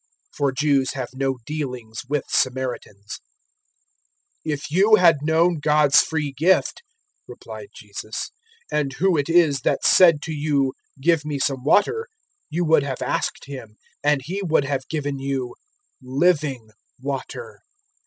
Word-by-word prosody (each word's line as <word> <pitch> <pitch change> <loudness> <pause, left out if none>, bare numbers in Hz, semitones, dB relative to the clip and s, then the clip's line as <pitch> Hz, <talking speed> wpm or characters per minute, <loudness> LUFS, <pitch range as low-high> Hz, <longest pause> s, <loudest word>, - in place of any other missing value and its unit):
(For 140 -1 +1
Jews 135 -1 +1
have 130 -3 -4
no 135 0 -1
dealings 125 -7 -5
with 145 -2 0
Samaritans.) 125 -5 -2 1.3
004:010 155 - +1
"If 145 0 -6
you 200 +6 +6
had 170 -5 +5
known 160 +2 +2
God's 150 -1 +5
free 150 -3 -2
gift," 175 +7 +2 0.5
replied - - -10
Jesus, - - -6 0.4
"and 145 -3 0
who 185 +5 +2
it 145 0 -1
is 160 -6 +4
that - - 0
said 165 -5 +6
to 160 - -4
you, 145 -3 0 0.3
`Give 160 +1 +2
me 150 -1 -3
some 135 -1 -1
water,' 445 - +2 0.4
you 170 +3 -1
would 160 -1 +4
have 135 -2 -4
asked - - -2
Him, 130 -6 -9 0.3
and 145 -1 +2
He 185 +8 -4
would 160 -6 +1
have 135 -2 -3
given 145 -3 -3
you 135 -2 -3 0.5
living 135 -4 0 0.3
water." 140 - -6
145 Hz, 140 wpm, -22 LUFS, 135-160 Hz, 1.3 s, you